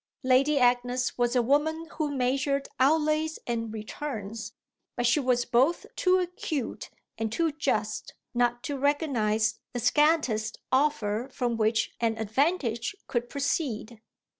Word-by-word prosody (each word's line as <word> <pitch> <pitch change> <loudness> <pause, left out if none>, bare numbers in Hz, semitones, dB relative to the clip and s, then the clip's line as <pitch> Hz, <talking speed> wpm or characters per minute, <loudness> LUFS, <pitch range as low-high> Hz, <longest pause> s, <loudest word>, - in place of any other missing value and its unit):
Lady 265 +3 +4
Agnes 245 0 +2
was 240 0 +1
a 245 - +4
woman 310 +6 +1
who 310 -2 -2
measured 275 +1 0
outlays 310 +3 +2
and 230 -2 -2
returns, 220 -1 -6 0.4
but 245 - -1
she 240 +5 +4
was 250 -3 +1
both 265 +8 +2
too 370 0 +3
acute 350 -7 -3 0.3
and 225 -1 -1
too 325 +6 +1
just 295 +1 -2 0.2
not 240 0 +1
to 285 -3 -3
recognise 255 -7 +1
the 245 - -2
scantest 260 -7 +2
offer 260 -4 +1
from 245 -2 -1
which 220 0 +1
an 225 -1 0
advantage 235 - 0
could 240 -1 -2
proceed. 245 -6 -2
255 Hz, 130 wpm, -28 LUFS, 230-295 Hz, 0.4 s, Lady